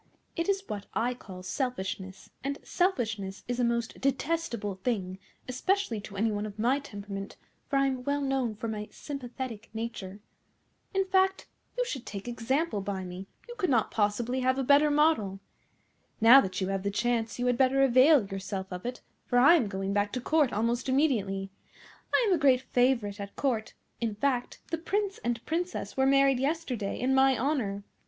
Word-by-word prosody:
It 335 +2 -1
is 390 0 +1
what 205 -1 -5
I 240 +3 +1
call 185 -7 -11
selfishness, 190 -5 -4
and 280 +1 -2
selfishness 220 - -1
is 245 0 -2
a - - +2
most 235 -1 -1
detestable 270 -6 -1
thing, 190 -6 -2 0.3
especially 255 - 0
to 200 -1 -9
any 220 +2 +2
one 205 0 -2
of 205 0 -10
my 245 +6 +2
temperament, 200 -6 -7 0.3
for 280 - -1
I 275 - +4
am 260 -2 -1
well 285 +2 0
known 265 -5 0
for 230 - -5
my 210 -1 -4
sympathetic 250 -5 -7
nature. 215 -4 -5 0.8
In 385 0 +2
fact, 380 0 +2 0.3
you - - +1
should 265 - -5
take 200 +2 -6
example 245 +1 -1
by 195 -1 -3
me; 185 +1 -7 0.2
you 480 - -7
could 365 -4 +1
not 235 -5 +2
possibly 225 +4 0
have 260 +1 +2
a 270 - 0
better 285 +3 +5
model. 290 -11 +2 0.8
Now 240 +4 +9
that 185 -4 -3
you 190 -1 -1
have 195 -1 -1
the 200 - -1
chance 225 +1 -1
you 245 - -1
had 250 -1 +3
better 265 +2 +3
avail 265 0 +6
yourself 195 -1 -5
of 180 +6 -5
it, 250 - -5 0.3
for 245 - +1
I 275 +7 +8
am 295 -11 +3
going 195 0 -3
back 205 0 +1
to 250 - -1
Court 295 0 +2
almost 235 +4 0
immediately. 200 -9 +1 0.6
I - - +4
am 390 - +4
a 345 - +2
great 260 -3 +5
favourite 245 -6 +1
at 200 0 -7
Court; 235 -6 -1 0.2
in 225 -3 -2
fact, 250 +2 -1
the 330 - -1
Prince 395 +3 -1
and 235 -1 -3
Princess 335 - -3
were 265 0 +3
married 275 -1 +4
yesterday 265 -8 -2
in 260 +2 +1
my 265 -1 +4
honour. 225 -7 -1
245 Hz, 185 wpm, -29 LUFS, 205-275 Hz, 0.8 s, Now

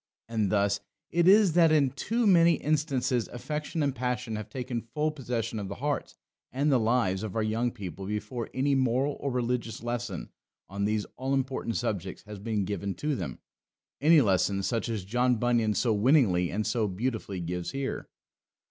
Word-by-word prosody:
And 110 -4 0
thus 100 -1 +2 0.3
it 170 +1 +3
is 200 -3 +6
that 165 -2 +5
in 145 -4 +4
too 225 - -1
many 170 -4 +6
instances 140 -6 0
affection 150 +5 -3
and 140 -2 +1
passion 125 -3 -2
have 105 -1 -6
taken 125 -2 -4
full 150 +8 -1
possession 120 -6 -3
of 100 - -4
the 100 - -5
hearts 145 +3 -3 0.3
and 140 +3 +1
the 130 - +4
lives 110 -5 +1
of 110 -3 -5
our 110 - +1
young 115 +3 0
people 95 -5 -7
before 105 +3 -4
any 140 +2 +1
moral 130 +2 +1
or 140 - -2
religious 120 -2 -2
lesson 120 -4 -4 0.4
on 100 +1 -2
these 105 0 0
all 135 +2 0
important 130 -3 -2
subjects 100 -6 -3
has 105 -1 -9
been 105 -1 -1
given 100 0 -3
to 150 -1 -1
them: - - -5 0.6
any 155 +1 +7
lesson 100 -2 +2
such 115 +2 -1
as 110 -5 -3
John 125 +4 +2
Bunyan 115 -2 +1
so 115 +1 +2
winningly 105 - +3
and 105 +3 -2
so 110 -1 +1
beautifully 105 -1 -3
gives 90 0 -3
here. 135 -1 -4
120 Hz, 175 wpm, -28 LUFS, 105-135 Hz, 0.6 s, any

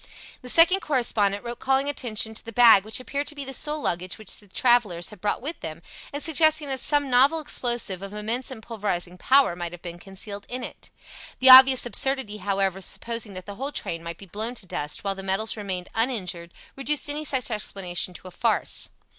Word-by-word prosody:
The 250 - -5
second 340 +7 +6
correspondent 220 - 0
wrote 240 +1 -6
calling 270 +1 +1
attention 225 -6 -1
to - - -6
the 230 - -9
bag 230 -4 +7
which 220 +3 0
appeared 280 +3 -4
to 305 - -4
be 285 -1 -5
the 270 - -7
sole 300 +3 -3
luggage 180 -7 -3
which 215 - -6
the 205 - -19
travellers 205 -5 +1
had 210 -4 -14
brought 210 +3 -2
with 315 +4 -4
them, 160 +1 -8 0.3
and 285 +1 -2
suggesting 315 -2 +2
that 265 -1 -2
some 290 +2 +1
novel 270 +5 +4
explosive 240 - -2
of 195 0 -8
immense 220 +5 -3
and 240 -5 -9
pulverizing 185 -6 -4
power 270 -7 +4
might 175 -1 -6
have 175 - -12
been 175 -1 -8
concealed 200 +2 -7
in 250 0 -5
it. - - -8 0.5
The 260 0 +8
obvious 260 0 +9
absurdity, 260 -3 0
however, 195 -2 -1
of 190 - 0
supposing 230 -3 +1
that 185 0 -8
the 205 - -8
whole 275 +4 -4
train 165 - -5
might 170 0 -7
be 200 - -12
blown 215 +6 -4
to 215 - -6
dust 150 -4 -4
while 195 -1 -1
the 195 - -8
metals 195 +3 -1
remained 190 -4 -5
uninjured 185 -8 -2 0.2
reduced 275 +2 0
any 295 +1 -3
such 260 -5 -1
explanation 185 -4 -2
to 185 - -11
a - - -10
farce. 220 +5 0
225 Hz, 210 wpm, -24 LUFS, 195-265 Hz, 0.5 s, obvious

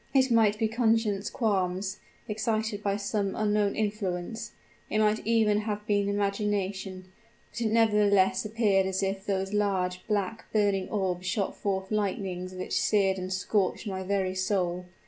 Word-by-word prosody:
It 265 -1 +4
might 220 -2 +4
be 220 0 +1
conscience 225 -3 +1
qualms, 190 -5 -1 0.3
excited 215 0 -1
by 200 -1 0
some 200 -1 -1
unknown 210 -1 +1
influence 205 -1 -3 0.4
it - - 0
might 215 0 +3
even 220 -2 +3
have 210 -1 -3
been 205 -1 +1
imagination; 200 -2 -2 0.4
but - - -6
it 220 -2 +1
nevertheless 210 -4 +4
appeared 210 -3 +2
as 190 +1 -1
if 195 0 -2
those 195 0 -1
large, 185 -3 0
black, 210 +1 -2
burning 200 -3 +1
orbs 185 -3 -1
shot 200 -1 -1
forth 190 -1 -2
lightnings 190 -3 -2
which 185 - -1
seared 195 -3 +2
and 185 0 -5
scorched 190 +2 0
my 190 -2 -3
very 190 -1 0
soul! 185 -2 -1
200 Hz, 145 wpm, -28 LUFS, 190-215 Hz, 0.4 s, It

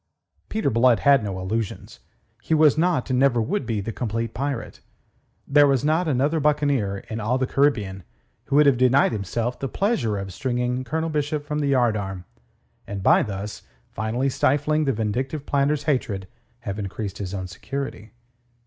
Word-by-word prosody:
Peter 215 -10 0
Blood 115 -1 +4
had 140 -4 +5
no 95 -2 -4
illusions. 105 +3 -4 0.4
He 160 - +1
was 155 -2 +5
not, 165 -4 +1
and 125 - +2
never 135 -3 +3
would 195 - -1
be, 110 -4 -1
the 110 +4 -4
complete 115 0 -3
pirate. 135 -3 -4 0.7
There 145 +1 +6
was 135 0 +1
not 160 +3 +2
another 145 +3 +1
buccaneer 140 -9 +1
in 110 - -4
all 115 +4 0
the 130 - 0
Caribbean 105 -10 0 0.4
who - - -1
would 150 +1 +6
have 135 -4 +4
denied 130 +2 +4
himself 115 +4 -3
the 135 - -2
pleasure 130 - 0
of 95 -1 -5
stringing 125 -2 -1
Colonel 160 +6 -2
Bishop 150 0 -2
from 150 0 -2
the 145 - 0
yardarm, 105 -7 0 0.6
and 100 -1 -5
by - - +5
thus 100 0 -5 0.3
finally 110 +5 -1
stifling 150 +3 +1
the 135 - +2
vindictive 130 +6 -2
planter's 145 +1 +1
hatred 110 -10 -1 0.3
have 100 -2 -5
increased 100 0 -5
his 100 -1 -4
own 95 -1 -4
security. 110 +4 -6
125 Hz, 165 wpm, -24 LUFS, 105-145 Hz, 0.7 s, There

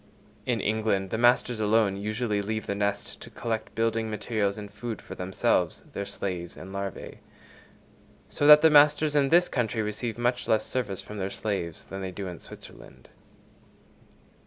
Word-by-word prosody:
In - - +1
England 105 -3 0
the - - -1
masters 120 -1 +3
alone 105 -2 +2
usually 105 +1 -1
leave 110 +1 -3
the - - -2
nest 100 0 -2
to - - -9
collect 115 -2 -4
building 115 0 0
materials 105 -1 -1
and 105 -1 -8
food 115 +1 -5
for - - -10
themselves, 90 +1 0
their 100 - -4
slaves 90 -3 -5
and 95 +1 -9
larvæ. 100 -1 -6 1.1
So 145 - 0
that 150 0 +10
the 160 - +6
masters 150 +1 +5
in 140 -2 +3
this 175 +3 +5
country 115 -3 -1
receive 105 +2 -3
much 120 +1 0
less 110 - +2
service 105 -7 -2
from 105 -1 -8
their 95 0 -2
slaves 95 -7 -4
than 95 0 -7
they 95 - -3
do 100 +2 -6
in 90 -3 -7
Switzerland. 65 0 -13
110 Hz, 165 wpm, -27 LUFS, 100-120 Hz, 1.1 s, that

